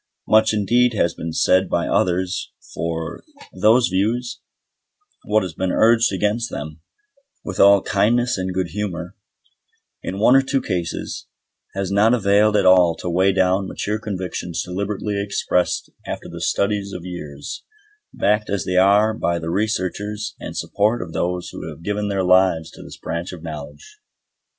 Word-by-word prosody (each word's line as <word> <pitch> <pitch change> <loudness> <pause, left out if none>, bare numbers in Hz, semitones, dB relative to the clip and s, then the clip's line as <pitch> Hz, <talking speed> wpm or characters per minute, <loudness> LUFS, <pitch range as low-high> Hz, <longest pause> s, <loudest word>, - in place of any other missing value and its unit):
Much 110 0 +4
indeed 115 +3 +2
has 85 -4 +1
been 80 - -5
said 95 +3 +2
by - - 0
others 90 +1 0 0.2
for 80 -1 -4 0.3
those 110 +6 +4
views; 115 +6 -1 0.9
what 105 0 +2
has 90 -3 -5
been 95 +3 -2
urged 115 0 +4
against 105 +4 0
them, 75 +1 -7 0.6
with 95 - -5
all 100 0 +6
kindness 120 +5 +2
and 95 0 -3
good 90 -1 -2
humour, 90 -3 -5 0.9
in 95 - -5
one 115 +5 +5
or 135 - +7
two 135 0 0
cases, 85 -7 -4 0.5
has 100 -1 -2
not 105 +4 +4
availed 105 0 +3
at - - +2
all 90 -3 +6
to 85 - -7
weigh 95 +3 +3
down 95 0 +1
mature 105 +3 -3
convictions 95 -5 -4
deliberately 100 +2 -3
expressed 100 -3 -1 0.2
after - - -5
the - - -8
studies 100 -1 0
of 90 - -7
years, 75 -6 -7 0.5
backed 105 +1 0
as 100 -4 -1
they 90 0 -1
are 100 +3 +5
by 85 -5 -1
the 80 0 -4
researches 105 +1 -2
and - - -7
support 105 +2 0
of 80 -3 -10
those 90 0 -2
who - - -7
have 85 - -11
given 105 +1 -2
their 100 -2 0
lives 90 -3 +3
to - - -13
this - - -11
branch 85 +2 -4
of 90 -3 -10
knowledge. 75 -2 -9
95 Hz, 160 wpm, -21 LUFS, 90-105 Hz, 0.9 s, or